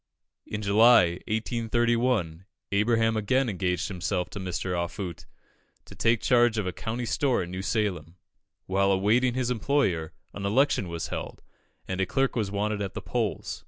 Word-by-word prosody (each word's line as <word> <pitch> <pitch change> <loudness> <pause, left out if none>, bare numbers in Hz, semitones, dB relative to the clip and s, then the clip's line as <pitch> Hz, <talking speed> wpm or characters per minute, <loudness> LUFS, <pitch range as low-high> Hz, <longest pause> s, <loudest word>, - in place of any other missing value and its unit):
In 105 0 -4
July, 100 -4 +5
1831, 115 -5 0 0.3
Abraham 115 +2 +2
again 125 +5 +1
engaged 90 -4 -1
himself 90 -1 -2
to - - -6
Mr. 90 0 -3
Offutt, 85 0 -4 0.6
to - - -12
take 115 -1 +1
charge 120 -2 +3
of 105 - -1
a 90 - -1
country 120 +2 -4
store 125 0 +1
at 85 - -8
New 95 +1 -5
Salem. 95 -6 -2 0.5
While 100 +1 +2
awaiting 115 +6 +2
his 125 -1 0
employer, 105 - 0 0.2
an 100 - -7
election 105 -1 +2
was 85 -1 -4
held, - - -6 0.4
and 95 0 -2
a 95 - 0
clerk 135 +5 0
was 110 -5 -1
wanted 105 +1 -2
at 100 -2 -4
the - - -4
polls. - - -2
105 Hz, 160 wpm, -27 LUFS, 90-120 Hz, 0.6 s, July